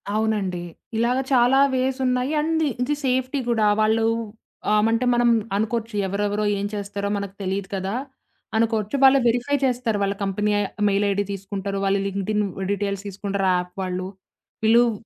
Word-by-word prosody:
అవునండి. 210 Hz, -5 st, 0 dB, 0.4 s
ఇలాగ 240 Hz, +2 st, +2 dB, 0.2 s
చాలా 250 Hz, +2 st, +5 dB, 0.2 s
వేస్ 260 Hz, +1 st, 0 dB
ఉన్నాయి. 250 Hz, +2 st, +1 dB
అండ్ 320 Hz, +1 st, +1 dB, 0.2 s
ఇది 295 Hz, +4 st, 0 dB
సేఫ్టీ 260 Hz, +2 st, 0 dB
కూడా. 225 Hz, -2 st, +2 dB, 0.2 s
వాళ్ళు, 220 Hz, +1 st, +3 dB, 0.7 s
ఆమంటే 225 Hz, +3 st, +2 dB
మనం 240 Hz, 0 st, +3 dB, 0.3 s
అనుకోవచ్చు, 225 Hz, +1 st, -2 dB
ఎవరెవరో 205 Hz, +2 st, -1 dB
ఏం 200 Hz, -, -2 dB
చేస్తారో 200 Hz, 0 st, -3 dB
మనకు 200 Hz, -1 st, -5 dB
తెలీదు 195 Hz, +1 st, -2 dB
కదా! 190 Hz, +1 st, -3 dB, 0.6 s
అనుకోవచ్చు. 220 Hz, 0 st, 0 dB
వాళ్ళు 270 Hz, 0 st, +7 dB
వెరిఫై 245 Hz, +5 st, +1 dB
చేస్తారు. 245 Hz, -4 st, 0 dB
వాళ్ళ 200 Hz, 0 st, 0 dB
కంపెనీ 205 Hz, +2 st, 0 dB, 0.4 s
మెయిల్ 200 Hz, +1 st, +2 dB
ఐడీ 200 Hz, +1 st, 0 dB
తీసుకుంటారు. 195 Hz, 0 st, -4 dB
వాళ్ళ 195 Hz, +1 st, +2 dB
లింక్డ్‌ఇన్ 200 Hz, +2 st, -1 dB, 0.3 s
డీటెయిల్స్ 200 Hz, -1 st, -2 dB
తీసుకుంటారు 200 Hz, 0 st, -2 dB
యాప్ 180 Hz, 0 st, -5 dB
వాళ్ళు. 185 Hz, 0 st, -3 dB, 0.6 s
పిలువ్ 235 Hz, +2 st, +5 dB
210 Hz, 140 wpm, -23 LUFS, 200-240 Hz, 0.7 s, వాళ్ళు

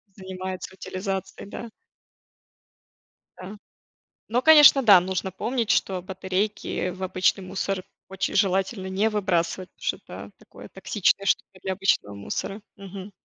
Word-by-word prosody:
занимается 185 Hz, -1 st, -6 dB
утилизацией", 195 Hz, +1 st, -5 dB
да. 235 Hz, +2 st, -7 dB, 1.7 s
Да. 195 Hz, +3 st, -9 dB, 0.7 s
Но, 240 Hz, +3 st, +1 dB
конечно, 295 Hz, -2 st, +8 dB
да, 205 Hz, -6 st, +8 dB
нужно 185 Hz, +1 st, -3 dB
помнить, 230 Hz, +4 st, -2 dB
что 185 Hz, -2 st, +1 dB
батарейки 190 Hz, +1 st, -2 dB
в 185 Hz, +1 st, -7 dB
обычный 185 Hz, +1 st, +1 dB
мусор 190 Hz, 0 st, -3 dB, 0.2 s
очень 190 Hz, 0 st, -3 dB
желательно 190 Hz, +1 st, +1 dB
не 200 Hz, +4 st, +1 dB
выбрасывать, 185 Hz, -3 st, -1 dB
потому -, -, -19 dB
что -, -, 0 dB
это -, -, -11 dB
такое -, -, -14 dB
токсичное 195 Hz, -1 st, 0 dB
что-то 190 Hz, -1 st, -1 dB
для 190 Hz, 0 st, -2 dB
обычного 185 Hz, -, 0 dB
мусора. 195 Hz, -, -5 dB
Мгм. 195 Hz, 0 st, -9 dB
190 Hz, 125 wpm, -25 LUFS, 185-205 Hz, 1.7 s, конечно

